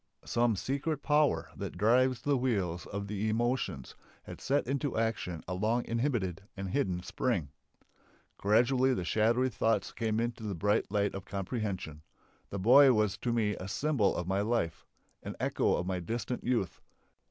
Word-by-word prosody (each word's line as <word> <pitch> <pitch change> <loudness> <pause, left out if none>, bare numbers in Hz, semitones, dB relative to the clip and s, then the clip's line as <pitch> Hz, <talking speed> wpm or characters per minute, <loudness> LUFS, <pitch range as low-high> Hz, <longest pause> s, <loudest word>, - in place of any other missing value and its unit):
Some 120 -2 +2
secret 140 - -2
power 150 0 +2
that - - -6
drives 125 +5 +3
the 145 -1 +2
wheels 100 -10 -1
of 100 0 -4
the 105 +1 -2
emotions 120 - -1 0.3
had - - -10
set 140 +2 +1
into 140 +1 -2
action 110 -7 -2
a 90 - -3
long 110 +6 0
inhibited 115 - -1 0.2
and 95 -1 -4
hidden 90 -10 0
spring. 95 - -1 0.9
Gradually 125 +5 +3
the 90 - -3
shadowy 115 +7 +2
thoughts 110 -2 0
came 110 -2 -1
into 115 0 -2
the 105 -3 -3
bright 105 +3 +1
light 100 -1 +1
of 95 -1 -6
comprehension. 100 - -4 0.5
The 100 - -4
boy 130 +7 +7
was 105 -3 +1
to 120 - -1
me 110 -3 +1
a 95 - -6
symbol 130 -2 +1
of 90 - -2
my 95 +2 0
life. 105 -7 -1 0.3
An - - -6
echo - - +1
of 90 - -2
my 95 -1 -2
distant 115 +7 -4
youth. 115 -8 -1
110 Hz, 165 wpm, -31 LUFS, 95-125 Hz, 0.9 s, boy